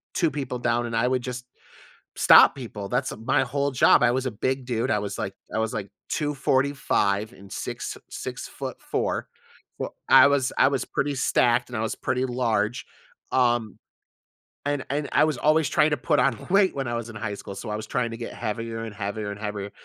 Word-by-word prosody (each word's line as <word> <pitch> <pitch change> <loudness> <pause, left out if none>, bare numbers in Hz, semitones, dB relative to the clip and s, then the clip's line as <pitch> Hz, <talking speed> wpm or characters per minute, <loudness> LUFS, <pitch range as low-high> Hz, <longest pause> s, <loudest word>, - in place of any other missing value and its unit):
2 165 -3 +2
people 135 -4 -4
down 120 0 0
and 115 - -4
I 125 - +2
would 130 0 +1
just 125 0 -6 0.7
stop - - +7
people, 110 -7 -7
that's, 130 +2 0
uh, - - -7
my 115 +4 +1
whole 140 0 -1
job, 130 - +5
I 120 - +5
was 130 +1 -1
a 130 - -1
big 130 +4 -2
dude, 120 0 -1
I 105 - +2
was 100 -1 -4
like 95 - -3 0.2
I 110 - 0
was 110 0 0
like 100 -2 -4 0.2
245 135 - 0
and 100 0 -15
six - - -5
6'4". - - -4 0.5
Fou - - -3 0.2
I 130 - +9
was 140 -2 +1
I - - +5
was 135 -2 -1
pretty 145 0 -1
stacked 120 -1 +2
and 120 - -4
I - - -1
was 115 - -1
pretty 130 +1 -1
large, 120 -3 0 0.5
um 120 -5 +1 0.9
and 145 -2 -1
and 145 +1 -1
I - - +5
was 155 -4 -1
always 155 0 +3
trying 150 - +3
to 150 - +1
put - - +1
on 125 -3 0
weight 195 0 +4
when 135 -2 -2
I 120 - -2
was 115 -1 -4
in - - -13
high 105 -1 -4
school, 100 - -8
so 100 - -7
I 105 - -2
was 110 - -5
trying 125 -2 -1
to 115 - -6
get 115 - -6
heavier 115 +1 -4
and 110 -2 -7
heavier 100 0 -4
and 100 - -8
heavier, 105 -1 -4
120 Hz, 210 wpm, -25 LUFS, 110-135 Hz, 0.9 s, I